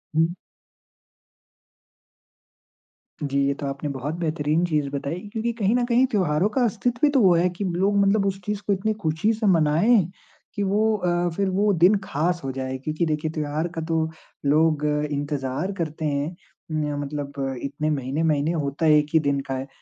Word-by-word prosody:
हुँ। 165 +2 +2 2.9
जी, 140 -1 0
ये 140 - +2
तो 140 - -6
आपने 140 +1 -3
बहुत 140 +3 -4
बेहतरीन 155 0 0
चीज़ 150 -4 0
बताई 140 +4 -3
क्योंकि 225 +1 -1
कहीं 205 +2 +2
न 245 - +2
कहीं 245 +2 +4
त्योहारों 180 -3 +2
का 260 - +3
अस्तित्व 235 +2 -1
भी 300 - +6
तो 280 -2 +3
वो 185 -3 +6
है, 175 +2 +3
कि 180 +3 -5
लोग 190 +3 +1
मतलब 200 +1 +3
उस 195 -1 -1
चीज़ 210 -1 -2
को 205 - +3
इतनी 200 +3 0
ख़ुशी 160 +7 +1
से 220 0 -3
मनाएँ 170 +4 +4 0.5
कि 205 - -1
वो 215 +3 +2
अ, 175 -2 0
फ़िर 195 -1 0
वो 205 +3 +2
दिन 190 +4 +7
ख़ास 170 +1 -1
हो 135 - -2
जाए। 130 0 -4
क्योंकि 155 +5 -2
देखिए 155 0 -1
त्योहार 155 +1 -2
का 165 - -2
तो 160 -1 +1 0.4
लोग 150 +1 +3 0.3
इंतज़ार 145 +3 -2
करते 160 -1 -3
हैं, 145 +3 -1 0.4
म 150 -2 -1
मतलब 145 0 -5 0.3
इतने 145 +2 -2
महीने-महीने, 150 +2 0
होता 150 -1 -2
1 150 -1 +5
ही 160 - +6
दिन 140 -2 0
का 135 - -2
है। 130 +1 -4
160 Hz, 175 wpm, -24 LUFS, 145-195 Hz, 2.9 s, दिन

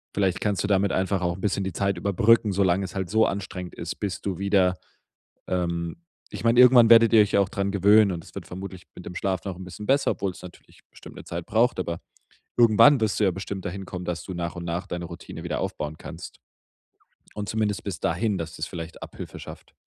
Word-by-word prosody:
vielleicht 95 -3 +1
kannst 100 -4 0
du - - -1
damit 100 -1 +2
einfach 95 +1 0
auch 85 -1 0
'n - - -11
bisschen 100 -1 0
die 95 - -4
Zeit 100 +1 0
überbrücken, 105 +4 +3
solange 95 0 +2
es 90 - -9
halt 95 -2 -3
so 110 +2 +4
anstrengend 90 -2 -5
ist, 85 -1 -5
bis 100 -3 -3
du 95 -3 -3
wieder, 95 -2 +2 0.7
ähm 85 -2 -2 0.3
ich - - -7
meine, 115 +1 +4
irgendwann 125 -2 +8
werdet 115 0 +7
ihr 110 - +8
euch 105 0 +1
ja - - +5
auch 100 - 0
dran 100 0 -2
gewöhnen 100 +1 +5
und 85 -2 -4
es - - -16
wird - - -7
vermutlich 95 0 -8
mit 90 - -11
dem 90 - -8
Schlaf 95 -2 -2
noch 95 -2 -4
'n 95 - -8
bisschen 100 +3 -9
besser, 140 +1 +3
obwohl 100 -1 -2
es - - -14
natürlich 90 -2 -14
bestimmt - - -13
'ne - - -9
Zeit 85 0 -5
braucht, 115 -1 +2
aber 85 -2 -3 0.6
irgendwann 120 +4 +6
wirst 110 -1 0
du - - +4
ja 95 - +4
bestimmt 95 +1 -6
dahin 95 +2 -5
kommen, 90 -1 -6
dass 85 -3 -3
du 95 - -6
nach 85 0 -4
und 85 - -6
nach 85 +1 -3
deine 90 0 -4
Routine 85 0 -9
wieder - - -2
aufbauen 75 +1 -4
kannst. - - -10 1.0
Und 105 -1 -4
zumindest 105 -2 -1
bis 95 -4 -5
dahin, 110 -4 0
dass 80 -1 -5
das - - -2
vielleicht 85 -2 -8
Abhilfe - - -9
schafft. - - -11
95 Hz, 230 wpm, -25 LUFS, 90-105 Hz, 1.0 s, irgendwann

